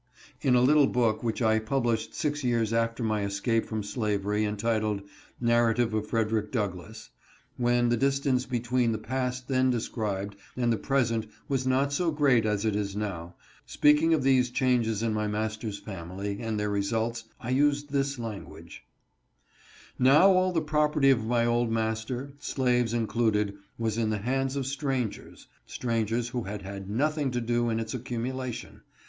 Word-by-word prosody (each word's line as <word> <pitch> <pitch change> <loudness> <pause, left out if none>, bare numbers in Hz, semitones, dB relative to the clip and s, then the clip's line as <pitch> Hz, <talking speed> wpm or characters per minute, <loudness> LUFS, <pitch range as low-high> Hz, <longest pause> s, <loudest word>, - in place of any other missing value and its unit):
In 130 -3 +3
a 125 - +5
little 145 +1 +5
book 115 -3 +1
which 115 -1 -1
I 110 0 +3
published 115 -1 -1
six 145 -1 -2
years 115 -3 +1
after 115 +1 0
my 110 -2 0
escape 100 +3 0
from 110 -2 -3
slavery, 105 -1 -1
entitled, 105 -1 -1 0.4
"Narrative 120 -1 +2
of 110 -1 -1
Frederick 110 -2 0
Douglass," 105 -2 -4 0.2
— - - -33
when 120 0 +3
the 120 - +2
distance 135 0 +1
between 120 -1 0
the - - -1
past 125 +2 -3
then 130 -1 +2
described 105 -4 -2 0.2
and 120 -2 +2
the - - 0
present 115 -5 0 0.2
was 135 -3 -1
not 135 +2 +2
so 170 +4 +1
great 140 -7 +3
as 105 0 0
it 110 -2 +1
is 100 -1 -2
now 90 -5 -4 0.2
— - - -29
speaking 150 +2 +5
of 145 - -1
these 130 -2 +3
changes 120 -4 +1
in 115 -1 0
my 105 0 -1
master's 110 0 -3
family, 95 +1 -6
and 110 -2 -2
their 105 0 -1
results, 110 +3 -1
I 120 - -4
used 145 +1 +2
this 140 0 0
language: 115 -4 -8 0.6
" - - -26
Now 165 +8 +7
all 185 0 +3
the 165 -2 +1
property 150 -2 +3
of 115 -4 +2
my 120 0 +2
old 120 0 +1
master, 115 +4 -2
slaves 125 -4 0
included, 110 -3 +1 0.2
was 115 -1 -1
in 110 -2 +1
the 110 - 0
hands 135 +5 -1
of 135 -2 -2
strangers 135 -4 -3
— - - -36
strangers 115 0 -1
who 120 0 -3
had 105 -1 -6
had 100 0 -7
nothing 145 +5 0
to 125 -1 -1
do 120 0 0
in 115 0 0
ite 110 -1 -4
accumulation. 125 0 -5
115 Hz, 170 wpm, -28 LUFS, 110-130 Hz, 0.6 s, Now